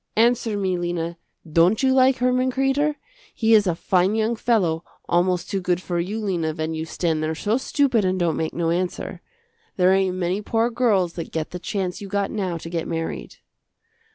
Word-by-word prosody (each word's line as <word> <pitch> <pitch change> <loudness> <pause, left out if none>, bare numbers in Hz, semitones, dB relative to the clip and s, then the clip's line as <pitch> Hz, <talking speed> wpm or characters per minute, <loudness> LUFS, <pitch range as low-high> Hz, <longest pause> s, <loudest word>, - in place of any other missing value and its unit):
Answer 230 -1 +2
me, 185 -3 0
Lena, 170 -1 -3 0.3
don't 170 - +3
you 260 0 +4
like 260 0 +4
Herman 255 +1 +1
Kreder? 270 +3 +1 0.4
He 225 -1 +3
is 210 -2 +5
a 175 - +1
fine 185 +4 +1
young 225 +1 +1
fellow, 185 -9 +1 0.2
almost 175 0 +1
too 195 - -2
good 180 -1 0
for 175 -1 -3
you, 195 +6 -2
Lena, 170 -7 -1
when 160 0 -3
you 160 0 -3
stand 160 -1 -1
there 155 +1 -1
so 210 +8 0
stupid 265 -4 +1
and 185 0 0
don't 170 -3 +1
make 160 - -2
no 165 -1 0
answer. 180 +1 -3 0.6
There 185 0 +5
ain't 190 -1 +1
many 185 +2 -1
poor 225 +3 0
girls 210 -8 +2
that 165 - -6
get 160 -1 -3
the 180 - -5
chance 190 -1 -3
you 200 - -6
got 200 0 -1
now 190 -5 -2
to 165 - -9
get 165 -2 -2
married." 165 -1 -4
185 Hz, 195 wpm, -23 LUFS, 170-225 Hz, 0.6 s, is